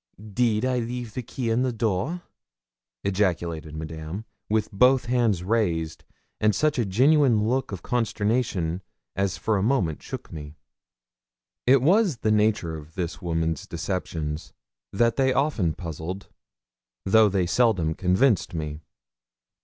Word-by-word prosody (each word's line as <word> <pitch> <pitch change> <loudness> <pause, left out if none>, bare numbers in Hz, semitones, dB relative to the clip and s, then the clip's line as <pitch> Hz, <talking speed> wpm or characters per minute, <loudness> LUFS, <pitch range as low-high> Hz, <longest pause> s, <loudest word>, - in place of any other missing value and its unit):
'Deed 115 0 +2
I 130 -1 +1
leave 120 -1 -4
the 125 - -3
key 120 0 -3
in 115 +2 +2
the 130 -1 +1
door?' 115 - -1 0.8
ejaculated 85 -5 -1
Madame, 80 +6 -6 0.2
with 110 0 0
both 125 +6 +4
hands 120 -7 +1
raised, 85 -7 -1 0.3
and 105 -2 +3
such 150 +5 +1
a 115 - +1
genuine 125 0 +4
look 130 +1 0
of 95 -3 -6
consternation 105 -6 0 0.3
as 95 -1 0
for 110 -2 0
a - - 0
moment 100 - +1
shook - - -8
me. 75 -1 -8 1.1
It 130 0 +6
was 185 - +4
the 110 -1 0
nature 105 -6 +2
of 75 0 -11
this 85 -3 -4
woman's 80 -2 -1
deceptions 80 -3 -4 0.4
that 115 +3 +2
they 130 -1 +3
often 130 - +1
puzzled 85 +3 -6 0.8
though 110 +2 +5
they 95 -2 +1
seldom 90 -5 +2
convinced 95 +3 +2
me. 75 -1 -4
105 Hz, 135 wpm, -25 LUFS, 85-120 Hz, 1.1 s, It